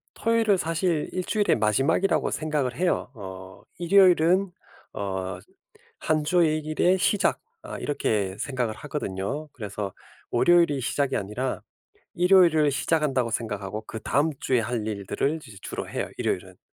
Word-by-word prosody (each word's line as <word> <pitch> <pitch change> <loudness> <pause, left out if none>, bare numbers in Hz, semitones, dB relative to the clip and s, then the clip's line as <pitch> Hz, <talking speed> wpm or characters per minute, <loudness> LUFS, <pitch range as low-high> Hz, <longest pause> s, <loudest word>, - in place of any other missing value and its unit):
토요일은 225 -3 +2
사실 165 -1 -1
1 185 - -1
주일의 210 -2 +2
마지막이라고 135 - +2
생각을 150 -5 -1
해요. 175 -5 0
어 95 -2 -9 0.2
'일요일은 180 0 +4 0.4
어 95 -1 -4 0.6
1 155 -1 +1
주의 160 -1 +3
일의 155 +5 +1
시작.' 200 +2 +2 0.2
아 - - -7
이렇게 105 -9 -1
생각을 125 -3 -2
하거든요. 145 +1 -4
그래서 105 -3 -5 0.4
'월요일이 165 +1 +4
시작이 140 +2 0
아니라 105 +6 -3 0.5
일요일을 175 -5 +5
시작한다.'고 140 -4 +1
생각하고 105 -2 -3
그다음 140 +8 0
주에 125 -2 +1
할 110 -1 -3
일들을 105 +8 -1
이제 110 -4 -12
주로 - - -5
해요 - - -3
일요일은. - - -3
145 Hz, 315 characters per minute, -25 LUFS, 110-170 Hz, 0.6 s, 일요일을